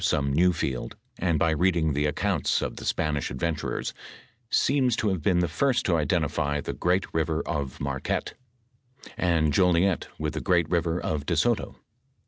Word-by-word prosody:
flome 70 -2 +1
new 90 +5 +4
field, 65 -6 -3 0.2
and 85 -3 +1
by 80 +2 +2
reading 80 -1 +2
the 75 +2 +1
acconnto - - 0
of - - -4
tbo - - -9
Spanish 75 -2 -1
adventurers, 80 +4 -3 0.6
seems 130 -4 +2
to 110 - 0
have 95 -4 -1
been 90 +3 +2
the 90 - +1
first 125 - +1
to 90 - +2
identify 75 -1 0
the - - -4
great 90 +2 +1
river 80 0 0
of 70 -3 -3
Marquette, 70 -1 -2 0.8
and 80 -4 +1
Jolliet 90 +2 +3
with 75 0 -3
the - - -3
great 85 -4 +2
river 85 0 +1
of 75 -2 -3
Do - - +1
Soto. - - +1
80 Hz, 165 wpm, -26 LUFS, 75-90 Hz, 0.8 s, new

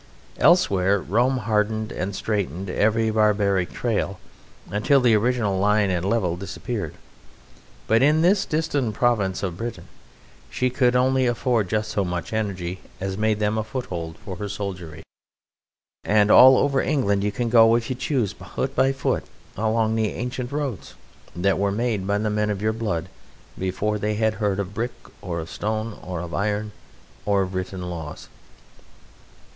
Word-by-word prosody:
Elsewhere 100 - +4
Rome 120 +9 +1
hardened 110 0 0
and 95 +2 -3
straightened 100 -3 -2
every 110 +2 +2
barbaric 100 -4 +2
trail 105 -5 -1 0.5
until 115 +8 +3
the 125 -3 +4
original 110 -3 +1
line 105 0 +3
and 90 -1 -1
level 95 -7 +1
disappeared; 100 - -5 0.9
but 115 +2 +3
in 150 +4 +4
this 190 +3 +4
distant 145 -8 -1
province 105 -7 +1
of 90 -3 -3
Britain 115 +3 -6 0.6
she 125 0 0
could 125 -1 +2
only 130 0 +3
afford 120 -4 0
just 110 0 -1
so 100 - 0
much 90 +2 -4
energy 95 -4 -3 0.2
as 95 0 -3
made 110 +1 +1
them 105 +1 0
a - - -1
foothold 90 -9 -5
for 95 -3 -6
her 105 +2 -4
soldiery; 90 -6 -6 1.0
and 105 0 +3
all 130 +1 +9
over 140 -1 +2
England 100 -9 +1
you 105 - 0
can 120 +4 -2
go, 115 -1 +6
if 115 -1 -1
you - - -1
choose, 125 -5 -1
foot 95 +9 -5
by 135 +1 +3
foot, 135 -1 -1 0.3
along 110 +1 +1
the 110 -1 0
ancient 125 +1 -4
roads 140 -8 -4 0.4
that 95 +2 +1
were 100 0 +1
made 105 -3 -1
by 100 0 +1
the 105 0 -1
men 105 0 0
of 105 -2 -2
your 110 +1 0
blood 100 -7 -2 0.5
before 105 +3 -2
they 105 +1 -1
had 110 0 +1
heard 100 -2 +1
of 100 0 -4
brick 120 +3 -2 0.3
or 85 -2 -4
of 80 - -6
stone 110 +1 -3
or 90 -2 -5
of 85 -1 -7
iron 105 +1 -1 0.5
or 100 -1 +2
of 95 0 -6
written 95 0 -4
laws. 80 -4 -7
105 Hz, 160 wpm, -23 LUFS, 95-120 Hz, 1.0 s, all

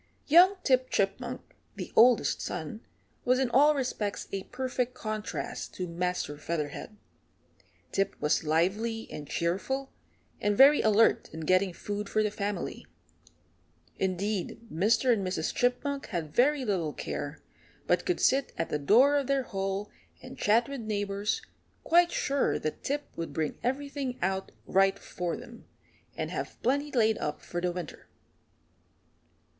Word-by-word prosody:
Young 355 +6 +7
Tip 255 -1 +3
Chipmunk, 195 -1 -1 0.3
the - - -7
oldest 240 -1 +5
son, 175 +5 -5 0.4
was 255 +1 +3
in 260 -2 0
all 295 +4 +5
respects 225 -6 -2
a 195 -1 -4
perfect 250 -1 -2
contrast 215 -1 -5
to 180 - -3
Master 175 -3 -2
Featherhead. 155 +6 -4 0.9
Tip 195 - 0
was 150 - +1
lively 195 +9 0
and 150 -1 -7
cheerful, 200 +11 -1 0.5
and 205 0 +1
very 285 +2 +8
alert 220 +1 +3
in 160 - -7
getting 185 +4 +3
food 205 +3 -5
for 215 - +2
the 210 - 0
family. 205 -2 -4 1.1
Indeed, 190 +1 -1
Mr. 225 +9 +3
and 205 -4 -1
Mrs. 185 -4 -2
Chipmunk 270 +3 0
had 165 -7 -4
very 270 +2 +3
little 175 -8 -1
care, - - -5 0.4
but - - +2
could 360 - 0
sit 270 +1 +2
at 165 - -2
the 150 - -1
door 250 - +5
of 280 -3 -1
their 275 -1 +1
hole 195 -1 -3 0.3
and 255 +1 -10
chat 230 -1 +3
with 275 -3 -5
neighbours, 205 - -2 0.4
quite 345 +1 +4
sure 275 0 +1
that 155 - -4
Tip 290 +1 -1
would 165 - -5
bring 155 -2 -2
everything 275 0 -2
out 190 +1 -1
right 195 0 +3
for 175 -3 -4
them, 235 -1 -12 0.5
and - - -3
have - - -5
plenty 285 +4 +1
laid 220 -3 +2
up 150 0 -3
for 175 - -4
winter. 175 -4 -7
210 Hz, 140 wpm, -29 LUFS, 185-260 Hz, 1.1 s, very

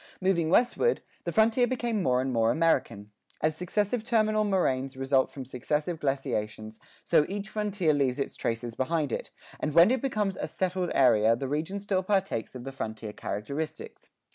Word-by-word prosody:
Moving 185 -4 +1
westward, 245 - +2 0.2
the - - -1
frontier 230 +2 +3
became 235 -4 -1
more 125 -6 +2
and 130 0 -2
more 115 -1 +3
American. 135 -11 +1 0.3
As 155 0 +1
successive 205 +6 -1
terminal 215 -2 +2
moraines 135 -10 0
result 135 0 +2
from 135 -2 -8
successive 150 +6 -2
glaciations, 110 -6 -3 0.2
so - - +4
each 205 +2 -4
frontier 205 -7 0
leaves 135 -3 +1
its 140 - -3
traces 115 0 -3
behind 145 +2 -1
it, - - -3 0.3
and 150 - -2
when 170 +6 +7
it 260 - +1
becomes 210 -8 -1
a - - -3
settled 185 -1 -1
area 115 -4 +5
the 135 +3 -4
region 155 +8 -2
still 195 -2 0
partakes 190 - -1
of 125 - -7
the 135 - -6
frontier 110 -4 -6
characteristics. 140 +13 -5
155 Hz, 165 wpm, -28 LUFS, 130-200 Hz, 0.3 s, when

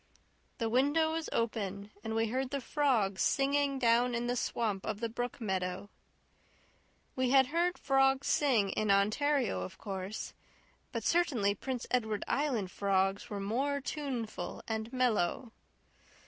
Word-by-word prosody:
The 230 - -1
window 290 +7 +3
was 325 0 -3
open 205 -3 -2
and 220 0 -3
we 225 0 +1
heard 260 +2 -1
the 280 +1 -2
frogs 240 -8 +1
singing 280 0 +2
down 240 0 +3
in 235 +1 -1
the 245 0 0
swamp 215 -5 -1
of 210 - -3
the 230 0 -2
brook 245 +1 -4
meadow. 190 -2 -3 1.2
We 255 -1 +1
had 265 0 +6
heard 350 +1 +1
frogs 270 0 +2
sing 235 -9 +2
in 215 -1 -1
Ontario, 215 - +2
of 90 - -7
course; 195 +1 -5 0.6
but 230 -3 -3
certainly 255 - +2
Prince 250 +4 -4
Edward 220 -4 0
Island 245 -11 0
frogs 195 +2 0
were 205 -2 -4
more 265 +8 0
tuneful 270 -6 -4
and 220 +1 -3
mellow. 245 -3 0
235 Hz, 140 wpm, -32 LUFS, 205-270 Hz, 1.2 s, had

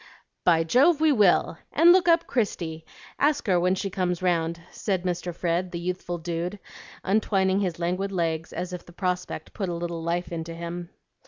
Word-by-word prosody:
"By 165 -2 +4
Jove, 275 - +4
we 315 -1 +4
will! 205 - +3
And 335 +3 +6
look 355 -1 +5
up 335 0 +4
Christie; 165 -9 -2 0.3
ask 290 0 +2
her 185 -4 +3
when 180 +2 +2
she 195 +1 -3
comes 180 -1 -1
round," 170 -2 +1
said 190 -4 -2
Mr. 180 -1 -2
Fred, 175 +1 -1
the 170 - -4
youthful 175 0 -3
dude, 170 +3 -3 0.5
untwining 195 -1 +2
his 180 -4 -1
languid 180 +3 -1
legs 165 -3 -1
as 180 +1 -4
if 180 - -6
the 175 - -16
prospect 180 0 -3
put 195 -4 -3
a 175 - -2
little 170 -1 -4
life 170 +2 -2
into 165 0 -5
him. 170 +1 -6
180 Hz, 180 wpm, -26 LUFS, 170-195 Hz, 0.5 s, And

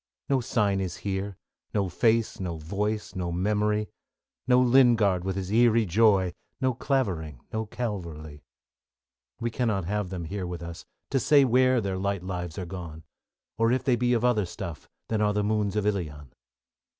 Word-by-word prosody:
No 135 -1 +3
sign 100 -4 +1
is 90 -3 -4
here, 100 -1 -2 0.4
No 100 -2 +2
face, 115 +5 +1
no 90 -3 -3
voice, 105 +7 -3
no 90 -2 -2
memory; 105 +3 +1 0.6
No 125 0 +5
Lingard 120 -7 +4
with 95 0 -2
his 95 0 -4
eerie 115 0 +4
joy. 95 -2 +3 0.3
No 130 -1 +1
Clavering, 95 - -1
no 110 0 -2
Calverly. 85 -11 -5
|42J - - -21 1.0
We 115 0 -1
cannot 110 -7 0
have 105 0 -2
them 90 -2 -4
here 95 +2 -4
with 85 -1 -6
us 85 0 -8 0.3
To 135 - +2
say 140 +2 +5
where 130 +1 +4
their 95 -2 -2
light 100 -1 -1
lives 90 -3 -5
are 95 - -3
gone, 85 -3 -8 0.6
Or 115 +1 +3
if 130 - +1
they 125 - +3
be 125 +1 +1
of 120 0 +1
other 110 -6 +2
stuff 85 -1 -7 0.2
Than 110 -1 0
are 105 -1 +2
the 105 0 +1
moons 105 -1 0
of 105 -1 0
Ilion. 75 -10 -3
100 Hz, 175 wpm, -27 LUFS, 90-115 Hz, 1.0 s, No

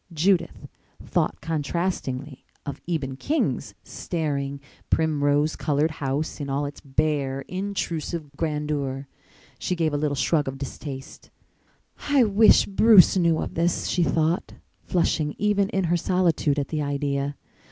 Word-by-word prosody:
Judith 170 +2 +1 0.4
thought - - 0
contrastingly 150 -4 -3 0.2
of 140 - -6
Eben 140 -6 -2
King's 310 - -1
staring, 140 -4 -3 0.3
primrose 150 -1 +2
colored 150 +2 +1
house 145 +2 -3
in 140 - -4
all 140 +2 0
its 145 - -7
bare, 140 -1 0
intrusive 170 -3 -4
grandeur. 150 -3 -2 0.5
She 180 - -1
gave 160 -3 0
a - - +1
little 145 -1 0
shrug 145 +3 +1
of 135 0 -4
distaste. 135 0 -8 0.8
"I 280 -3 +5
wish 215 0 +5
Bruce 200 -2 +6
knew 170 -3 +3
of - - -4
this," 170 +1 0
she 180 - 0
thought, 165 +2 +1 0.3
flushing 155 -4 0
even 200 -1 +2
in 195 - 0
her 175 0 +2
solitude 170 -5 +1
at 140 - -2
the 155 -2 -2
idea. 140 0 -1
155 Hz, 130 wpm, -25 LUFS, 140-175 Hz, 0.8 s, Bruce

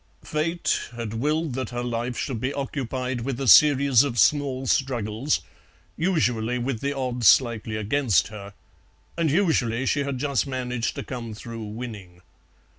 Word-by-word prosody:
Fate 165 +3 -1
had 115 -2 -5
willed 150 +5 -1
that 130 -2 -3
her 120 0 -4
life 120 0 -3
should 125 -6 -3
be 130 - -1
occupied 130 -2 -3
with 130 +1 -3
a 135 - -2
series 140 - +7
of 140 -4 -1
small 135 -1 +2
struggles, 125 0 0 0.5
usually 125 -9 0
with 125 -1 -2
the 140 +3 -1
odds 125 -4 0
slightly 115 -1 +3
against 110 - +1
her, 100 -2 -10 0.6
and 165 -2 +1
usually 135 - +1
she 145 - +1
had 140 -2 -2
just 140 -1 0
managed 125 -3 -3
to - - -5
come 115 -4 -6
through 115 +1 -8
winning. 105 -5 -8
125 Hz, 150 wpm, -25 LUFS, 115-140 Hz, 0.6 s, series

